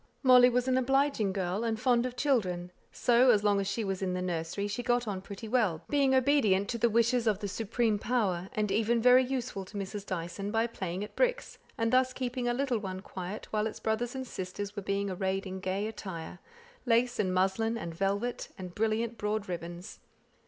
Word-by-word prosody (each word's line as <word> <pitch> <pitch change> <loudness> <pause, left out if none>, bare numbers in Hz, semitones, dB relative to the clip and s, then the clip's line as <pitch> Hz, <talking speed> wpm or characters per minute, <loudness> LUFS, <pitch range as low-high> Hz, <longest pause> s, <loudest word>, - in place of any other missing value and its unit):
Molly 250 -1 +8
was 250 +1 0
an 260 0 +3
obliging 270 -5 +2
girl, 190 +2 -2
and 225 -1 -1
fond 245 0 +2
of 250 - -8
children; 190 -11 0 0.2
so, 245 +1 +4
as 210 -4 +4
long 205 -1 +3
as 195 - -3
she 205 +3 -1
was 195 -2 -3
in 185 -1 -1
the 180 - -2
nursery, 175 +3 -2
she 205 +4 -3
got 245 -1 +1
on 195 -3 -3
pretty 200 +3 -8
well, 215 -9 +1
being 275 -2 +3
obedient 245 -8 +3
to 235 - -2
the 235 - +3
wishes 235 +1 +2
of 210 -3 +3
the 205 0 -4
supreme 220 +1 0
power, 195 -7 0
and 210 -2 -1
even 225 +3 +2
very 250 +2 +6
useful 250 -6 -3
to 190 - -9
Mrs. 200 +1 -5
Dyson, 185 +1 -4
by 225 +2 +1
playing 190 -5 -4
at 210 - -9
tricks, - - 0 0.2
and 225 +1 0
thus 255 0 +3
keeping 250 -1 -3
a 240 - +2
little 260 -3 0
one 190 -2 -5
quiet 190 +2 -6
while 215 0 +1
its 220 - -7
brothers 235 +3 -1
and 260 0 -4
sisters 200 -1 -6
were 205 - -3
being 200 +1 -1
arrayed 190 +1 -2
in 190 0 -5
gay 190 +2 -2
attire, 185 -6 -6 0.5
lace 240 +1 +2
and 185 -3 +1
muslin, 195 +5 +1
and 170 -6 -5
velvet, 200 +7 -2
and 180 -2 -7
brilliant 225 +2 -1
broad 210 0 -1
ribbons. 175 +2 -6
215 Hz, 205 wpm, -30 LUFS, 190-245 Hz, 0.5 s, Molly